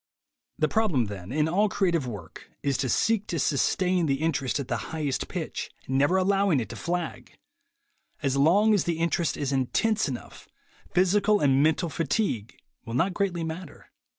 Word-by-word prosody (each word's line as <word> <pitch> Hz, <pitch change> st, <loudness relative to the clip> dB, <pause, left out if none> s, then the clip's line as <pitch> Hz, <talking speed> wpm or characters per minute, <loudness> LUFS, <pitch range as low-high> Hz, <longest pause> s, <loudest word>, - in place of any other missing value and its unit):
The -, -, +2 dB
problem, 200 Hz, -, +1 dB
then, 100 Hz, -2 st, -7 dB
in 150 Hz, +2 st, +1 dB
all 200 Hz, +6 st, +2 dB
creative 170 Hz, -9 st, 0 dB
work, 100 Hz, -9 st, -9 dB
is 140 Hz, -1 st, +1 dB
to 130 Hz, -1 st, -1 dB
seek 215 Hz, -, +1 dB
to 170 Hz, -, -2 dB
sustain 175 Hz, +5 st, +1 dB
the 135 Hz, -, +2 dB
interest 140 Hz, -3 st, -1 dB
at 135 Hz, -, -4 dB
the -, -, -1 dB
highest 150 Hz, -4 st, -2 dB
pitch, -, -, -4 dB, 0.2 s
never 140 Hz, +7 st, +2 dB
allowing 195 Hz, -4 st, +2 dB
it 115 Hz, -, -4 dB
to -, -, -7 dB
flag. 175 Hz, 0 st, -4 dB, 0.9 s
As 135 Hz, -1 st, +1 dB
long 190 Hz, +10 st, +4 dB
as 205 Hz, -, +2 dB
the 170 Hz, -2 st, -1 dB
interest 170 Hz, 0 st, 0 dB
is 140 Hz, -2 st, -2 dB
intense 205 Hz, -, +1 dB
enough, 125 Hz, -, -8 dB, 0.4 s
physical 200 Hz, +4 st, +3 dB
and 135 Hz, -2 st, +3 dB
mental 160 Hz, +3 st, +2 dB
fatigue 145 Hz, -, -1 dB, 0.3 s
will 115 Hz, -1 st, -6 dB
not 175 Hz, +9 st, +1 dB
greatly 180 Hz, -3 st, -1 dB
matter. 160 Hz, 0 st, -7 dB
160 Hz, 165 wpm, -26 LUFS, 135-185 Hz, 0.9 s, long